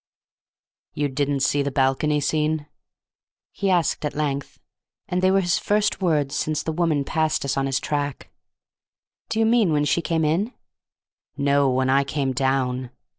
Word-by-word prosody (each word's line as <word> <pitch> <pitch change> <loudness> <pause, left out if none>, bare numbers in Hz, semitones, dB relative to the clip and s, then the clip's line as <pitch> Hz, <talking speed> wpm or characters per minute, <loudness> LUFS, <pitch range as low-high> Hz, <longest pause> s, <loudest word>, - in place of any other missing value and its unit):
"You 145 -1 0
didn't 140 0 -1
see 145 +1 +2
the 140 - -1
balcony 140 +2 +1
scene?" 155 +1 0 0.9
he 200 - -2
asked 175 -4 +1
at 150 - -3
length; 140 -2 -3 0.5
and 180 0 -1
they 185 - +4
were 195 +1 +3
his 175 -1 +1
first 210 0 0
words 150 -6 +1
since 155 0 -1
the 160 - -2
woman 160 -3 +1
passed 155 0 0
us 140 - -1
on 135 0 0
his 135 0 0
track. 145 -2 -3 1.0
"Do 225 - -2
you 225 - +4
mean 225 -6 +3
when 150 -1 +2
she 145 +4 +1
came 160 -1 0
in?" 190 +11 0 0.8
"No, 140 -1 +3
when 130 +1 +1
I 140 +1 +4
came 140 -1 -2
down." 130 -1 0
145 Hz, 165 wpm, -23 LUFS, 140-165 Hz, 1.0 s, they